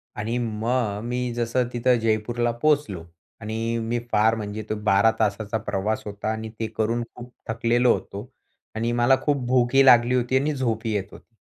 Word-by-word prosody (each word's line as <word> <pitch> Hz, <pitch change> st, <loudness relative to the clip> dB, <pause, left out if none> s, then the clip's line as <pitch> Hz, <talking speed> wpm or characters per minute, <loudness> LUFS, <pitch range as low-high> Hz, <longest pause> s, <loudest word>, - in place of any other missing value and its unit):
आणि 115 Hz, +3 st, -2 dB
मग 110 Hz, -2 st, -1 dB
मी 125 Hz, +1 st, -2 dB
जसं 120 Hz, +1 st, 0 dB
तिथं 120 Hz, 0 st, +2 dB
जयपूरला 115 Hz, +2 st, 0 dB
पोहोचलो 140 Hz, -, +1 dB, 0.4 s
आणि 115 Hz, +2 st, -3 dB
अ, -, -, -2 dB
मी 120 Hz, +2 st, -1 dB
फार 110 Hz, +2 st, +3 dB
म्हणजे 105 Hz, 0 st, -5 dB
तो 110 Hz, -, -1 dB
12 105 Hz, +2 st, +4 dB
तासाचा 110 Hz, +1 st, 0 dB
प्रवास 105 Hz, +1 st, -2 dB
होता 105 Hz, +1 st, -4 dB
आणि 110 Hz, 0 st, -5 dB
ते 110 Hz, -, -1 dB
करून 115 Hz, +2 st, 0 dB
खूप 125 Hz, 0 st, -11 dB, 0.2 s
थकलेलो 120 Hz, +2 st, +2 dB
होतो 105 Hz, +6 st, -7 dB, 0.5 s
आणि 115 Hz, +2 st, -1 dB
मला 120 Hz, +2 st, +4 dB
खूप 140 Hz, -4 st, 0 dB
भूकही 130 Hz, +2 st, +4 dB
लागली 120 Hz, 0 st, +6 dB
होती 125 Hz, +1 st, +1 dB
आणि 150 Hz, +3 st, 0 dB
झोपही 115 Hz, -3 st, -1 dB
येत 100 Hz, -2 st, -1 dB
होती. 115 Hz, -, -16 dB
115 Hz, 170 wpm, -24 LUFS, 110-120 Hz, 0.5 s, लागली